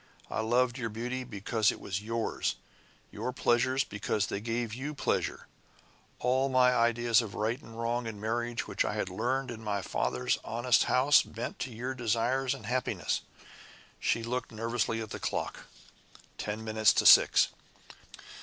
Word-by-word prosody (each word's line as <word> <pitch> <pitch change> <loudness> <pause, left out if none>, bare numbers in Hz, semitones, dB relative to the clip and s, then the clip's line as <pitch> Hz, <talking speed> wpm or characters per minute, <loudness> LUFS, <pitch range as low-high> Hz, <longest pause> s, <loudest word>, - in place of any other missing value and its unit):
I - - -2
loved 120 +3 +1
your 115 -2 -2
beauty 120 +4 -4
because 110 -1 0
it - - -8
was 95 +1 -4
yours; 115 +1 -2 0.6
your 125 - -3
pleasures 130 +1 +2
because 105 -1 -1
they 100 - -3
gave 115 0 -2
you 140 +5 -5
pleasure. - - -1 0.7
All 130 +2 +1
my 125 -1 +4
ideas 120 0 +3
of 110 -4 -7
right 115 +6 -1
and 115 0 -11
wrong 120 +1 -1
in 110 -2 -6
marriage 120 +2 -2
which - - 0
I - - -2
learned 125 +8 -2
in 110 -1 -8
my 100 -2 -2
father's 65 0 -1
honest 120 +2 +2
house 135 +3 +5
bent 115 +2 -6
to 130 - -4
your 125 +4 -4
desires 125 +2 0
and - - -11
happiness." 125 +1 -1 0.8
She 115 - 0
looked 120 +1 -3
nervously 115 0 -1
at 110 - -10
the - - -5
clock. - - -3 0.7
Ten 105 +1 -4
minutes 110 -1 +3
to - - +1
six. - - +7
115 Hz, 155 wpm, -30 LUFS, 110-125 Hz, 0.8 s, six